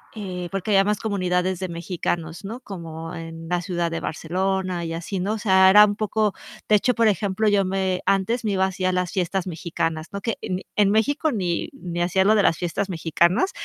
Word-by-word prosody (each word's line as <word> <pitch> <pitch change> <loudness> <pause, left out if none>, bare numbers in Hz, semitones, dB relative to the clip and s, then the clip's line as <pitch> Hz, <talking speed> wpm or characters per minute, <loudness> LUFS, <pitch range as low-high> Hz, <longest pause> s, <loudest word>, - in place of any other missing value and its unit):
eh, 180 -4 -5
porque 195 +2 -2
había 195 -1 +5
más 210 0 0
comunidades 185 -3 0
de 185 - -3
mexicanos, 170 0 -3
¿no? 230 +6 -6
Como 165 -6 -7
en 165 0 -8
la 175 +1 0
ciudad 175 -2 -2
de 165 - -2
Barcelona 185 +2 -2
y 165 -1 -4
así, 175 +4 -4
¿no? 195 +4 -1
O 220 - -2
sea, 190 -2 +5
era 210 +2 +9
un 205 0 -1
poco 215 -1 0 0.3
de 215 - +5
hecho, 250 +4 +1
por 230 -1 +3
ejemplo, 205 +1 +1
yo 205 -1 +4
me 190 -1 -1
antes 195 +5 +1
me 210 - 0
iba 190 0 +2
así 185 -1 -3
a 185 - +3
las 180 -1 -1
fiestas 190 0 -1
mexicanas, 165 -2 -3
¿no? 200 - -4
Que 230 0 -2
en 185 0 -3
en 205 -2 +4
México 285 +9 +2
ni 180 -6 -1
ni 175 -9 -5
hacía 185 +2 +2
lo 210 - +5
de 210 - +4
las 165 - +3
fiestas 180 +3 -2
mexicanas 170 - +1
190 Hz, 215 wpm, -23 LUFS, 175-205 Hz, 0.3 s, era